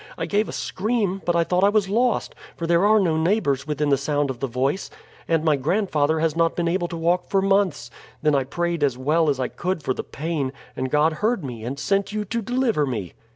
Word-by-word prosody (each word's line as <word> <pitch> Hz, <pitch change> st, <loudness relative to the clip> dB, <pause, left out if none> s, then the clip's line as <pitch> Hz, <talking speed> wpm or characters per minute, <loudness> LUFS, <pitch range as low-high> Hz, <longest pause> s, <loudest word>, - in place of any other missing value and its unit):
I -, -, -2 dB
gave 210 Hz, +1 st, 0 dB
a -, -, -4 dB
scream; 200 Hz, -2 st, -1 dB
but 175 Hz, -, +1 dB
I 170 Hz, -, +4 dB
thought 180 Hz, +2 st, +1 dB
I 200 Hz, -, +6 dB
was 205 Hz, -2 st, +2 dB
lost, 235 Hz, +4 st, +1 dB, 0.2 s
for 170 Hz, -, -3 dB
there 170 Hz, +4 st, +3 dB
are 215 Hz, +1 st, +5 dB
no 165 Hz, -5 st, +1 dB
neighbors 160 Hz, -6 st, +1 dB
within 150 Hz, -1 st, +1 dB
sound 145 Hz, 0 st, 0 dB
of 125 Hz, -, -9 dB
the 135 Hz, -, -1 dB
voice, 135 Hz, +9 st, -1 dB, 0.4 s
and 165 Hz, -2 st, +1 dB
my 155 Hz, -2 st, +3 dB
grandfather 160 Hz, 0 st, +1 dB
has 160 Hz, -2 st, +1 dB
not 165 Hz, 0 st, +2 dB
been 170 Hz, -1 st, 0 dB
able 175 Hz, +1 st, 0 dB
to 170 Hz, -, -6 dB
walk 170 Hz, +2 st, 0 dB
for 195 Hz, -, +2 dB
months. 190 Hz, -11 st, +1 dB, 0.3 s
Then 150 Hz, +1 st, +2 dB
I 135 Hz, -2 st, +2 dB
prayed 170 Hz, +2 st, -2 dB
as 135 Hz, -4 st, +1 dB
well 155 Hz, +4 st, +2 dB
as 140 Hz, -2 st, 0 dB
I 130 Hz, -, 0 dB
could 180 Hz, -3 st, -3 dB
for 130 Hz, -, 0 dB
the -, -, -5 dB
pain, 150 Hz, -4 st, -3 dB, 0.2 s
and 130 Hz, 0 st, -2 dB
God 150 Hz, +3 st, +3 dB
heard 215 Hz, -6 st, +1 dB
me 120 Hz, -4 st, -7 dB
and 130 Hz, +4 st, -4 dB
sent 195 Hz, +7 st, 0 dB
you 210 Hz, 0 st, -2 dB
to 230 Hz, +4 st, -2 dB
deliver 230 Hz, -, 0 dB
me." 105 Hz, -9 st, -4 dB
165 Hz, 235 wpm, -23 LUFS, 140-195 Hz, 0.4 s, I